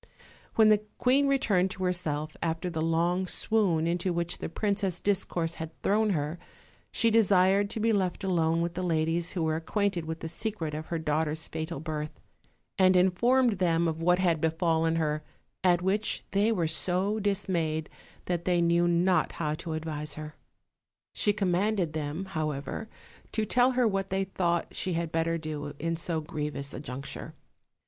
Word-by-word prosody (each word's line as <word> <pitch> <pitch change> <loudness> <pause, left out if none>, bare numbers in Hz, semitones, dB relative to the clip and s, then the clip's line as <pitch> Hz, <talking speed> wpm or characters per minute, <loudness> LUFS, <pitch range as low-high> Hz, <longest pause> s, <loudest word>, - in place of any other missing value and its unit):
When 220 -1 +6
the 210 -1 +5 0.2
queen 270 +3 +3
returned 210 -9 +2
to 190 - -5
herself, 155 -4 -1
after 165 +2 -2
the 160 -1 -2
long 170 +3 +1
swoon 185 -7 +2
into 175 +2 0
which 170 0 -2
the - - -4
princess' 195 -1 -1
discourse 175 -4 -1
had 160 0 -7
thrown 215 +2 +3
her, 155 +1 -2 0.5
she 230 - +2
desired 200 -2 +4
to 220 - -3
be 225 +1 +2
left 185 -3 0
alone 165 -3 +2
with 170 0 -2
the 185 - -3
ladies 165 0 0
who 175 - -1
were 160 0 +1
ac 160 - -8
quainted 200 -5 0
with 160 0 -5
the - - -4
secret 170 -3 -3
of 155 +1 -5
her 170 - -2
daughter's 155 0 -1
fatal 160 -1 -4
birth; 155 -1 -5 0.6
and 185 0 +6
informed 215 +5 +3
them 170 -2 +2
of 160 0 -2
what 180 +1 +4
had 170 -4 +1
befallen 165 0 +1
her, 155 -2 0 0.4
at 180 -1 +3
which 205 +3 0
they 205 +3 +3
were 175 -7 +1
so 185 +6 0
dismayed 175 -6 -1 0.4
that 175 -1 -2
they 180 -1 +2
knew 170 0 +3
not 175 0 +2
how 150 -2 -2
to 160 +1 -5
advise 155 -2 -4
her. 155 0 -7 0.8
She 205 - +2
commanded 195 -3 0
them, 155 +4 -3
however, 155 +3 -4 0.4
to 220 - +1
tell 250 +4 +3
her 250 -2 +3
what 195 -2 -1
they 195 +1 0
thought 175 -3 -1
she 185 - -2
had 165 -1 -2
better 165 +1 0
do 150 -2 -5
in 165 +3 -1
so 165 -1 -1
grievous 150 -3 -4
a - - -5
juncture. 135 -1 -7
170 Hz, 170 wpm, -29 LUFS, 160-195 Hz, 0.8 s, When